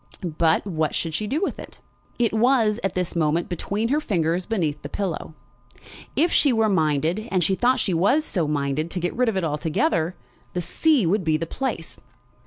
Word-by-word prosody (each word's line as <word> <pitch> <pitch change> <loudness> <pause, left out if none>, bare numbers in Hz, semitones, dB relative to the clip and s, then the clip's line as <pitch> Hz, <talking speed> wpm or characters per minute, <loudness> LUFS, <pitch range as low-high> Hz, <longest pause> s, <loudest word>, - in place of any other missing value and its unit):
But 160 +2 +2
what 160 -6 -1
should 165 -2 -2
she 210 +6 -2
do 285 +9 -1
with - - -2
it? - - -11 0.4
It 235 -3 +1
was, 225 -2 +3
at 195 - -1
this 180 -1 -2
moment, 165 +1 +1
between 205 +6 -2
her 290 +3 +2
fingers 175 - -1
beneath 170 -10 -1
the 145 - -7
pillow. 180 -5 -4 0.8
If 335 +3 +3
she 285 - +4
were 225 -2 +2
minded, 165 +4 +1
and 185 -2 +1
she 190 - +2
thought 250 +6 +2
she 195 -4 0
was 230 - +3
so 170 - -1
minded, 145 +2 -1
to 180 - -3
get 175 +1 -2
rid 250 -1 +2
of 205 - -2
it 190 - 0
altogether, 165 - 0 0.4
the 180 - -1
sea 300 - +2
would 190 +4 +1
be 160 -2 +2
the 165 - -3
place. 230 -3 -4
185 Hz, 195 wpm, -23 LUFS, 160-225 Hz, 0.8 s, she